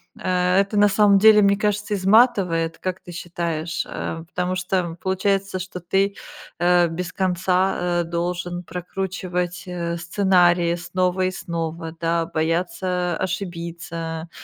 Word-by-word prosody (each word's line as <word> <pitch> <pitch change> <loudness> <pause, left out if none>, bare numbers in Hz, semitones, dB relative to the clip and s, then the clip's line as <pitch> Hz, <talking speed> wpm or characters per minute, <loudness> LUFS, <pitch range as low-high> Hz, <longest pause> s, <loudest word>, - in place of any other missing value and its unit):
это 185 +3 +1
на 205 - +6
самом 200 -1 +5
деле, 215 0 +7
мне 200 0 +4
кажется, 210 0 -1
изматывает, 185 -5 +3
как 185 0 -4
ты 175 - -11
считаешь, 170 -1 -3
а, 160 0 -5
потому 180 +2 -3
что, 185 +1 -1
м, 170 -2 -2
получается, 190 +2 -1
что 180 0 -6
ты, 195 +3 0 0.4
а, 175 0 +4
без 180 +2 -5
конца, 185 0 +1 0.2
а, - - -1
должен 175 +1 -3
прокручивать, 180 0 -4
э, 170 -1 -3
сценарии 175 -1 +3
снова 185 +1 0
и 185 - +2
снова, 165 -1 -5
да, 165 0 +1
бояться 175 +2 -1
ошибиться, 170 -3 -5
180 Hz, 130 wpm, -22 LUFS, 170-190 Hz, 0.4 s, деле